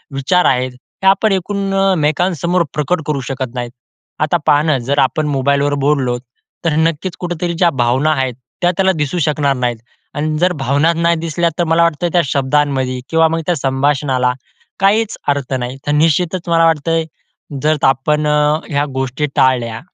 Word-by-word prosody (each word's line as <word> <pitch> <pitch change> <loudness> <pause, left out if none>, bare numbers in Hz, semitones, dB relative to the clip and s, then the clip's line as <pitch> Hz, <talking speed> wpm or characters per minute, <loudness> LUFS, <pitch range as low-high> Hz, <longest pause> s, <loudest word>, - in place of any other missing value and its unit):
विचार 180 +7 +1
आहेत, 130 0 +1
हे 125 +9 -6
आपण 200 +3 +4
एकमेकांसमोर 185 -3 0
प्रकट 155 +4 -1
करू 150 -2 -1
शकत 130 -2 -4
नाहीत. 120 -1 -4 0.5
आता 155 +3 +1
पहा 145 - +5
ना, 155 -3 +2
जर 135 +4 -1
आपण 140 +4 +1
मोबाईलवर 140 +1 +1
बोललोत 130 -5 +1 0.4
तर 160 -3 +1
नक्कीच 165 +2 0
कुठेतरी 175 -1 -3
ज्या 170 +1 +3
भावना 130 +6 +2
आहेत, 130 -3 -1 0.3
त्या 175 0 +3
त्याला 190 -1 +3
दिसू 150 +3 -2
शकणार 145 -2 +1
नाहीत 125 -2 -1 0.4
आणि 155 +1 -1
जर 180 +1 +2
भावना 140 +6 +2
नाही 170 +1 +1
दिसल्या 165 +1 0
तर - - +3
मला 165 +1 +3
वाटतं 170 0 0
त्या 175 - +4
शब्दांमध्ये 135 -1 0
किंवा 165 0 +4
मग 165 +1 -1
त्या 175 - +2
संभाषणाला 135 -2 0 0.5
काहीच 205 +3 +2
अर्थ 140 -2 -1
नाही. 125 +2 -5
तर - - +1
निश्चितच 165 +4 +1
मला 165 0 +4
वाटतंय 165 +1 +1 0.6
जर 155 +1 +2
आपण 150 +3 +1 0.4
ह्या 145 -1 +1
गोष्टी 135 +2 -2
टाळल्या. 120 -4 +1
150 Hz, 160 wpm, -16 LUFS, 135-170 Hz, 0.6 s, पहा